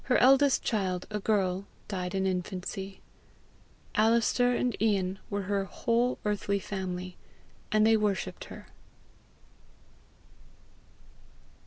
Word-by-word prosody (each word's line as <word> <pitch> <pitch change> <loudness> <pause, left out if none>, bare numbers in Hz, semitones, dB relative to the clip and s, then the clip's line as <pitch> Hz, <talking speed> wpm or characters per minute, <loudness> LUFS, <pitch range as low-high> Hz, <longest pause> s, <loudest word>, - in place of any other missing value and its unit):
Her 250 - +3
eldest 270 +2 +5
child, 185 -4 -1
a 210 - -1
girl, 195 -2 0 0.2
died 180 -2 -3
in 190 0 +1
infancy. 190 +1 -3 0.9
Alister 235 +3 +3
and 245 0 0
Ian 195 -3 +1
were 205 -1 -2
her 195 0 -1
whole 235 +5 0
earthly 205 -1 0
family, 185 -2 -5 0.5
and 215 0 +4
they 225 0 +6
worshipped 210 -2 -1
her. - - -11
200 Hz, 105 wpm, -29 LUFS, 190-225 Hz, 0.9 s, they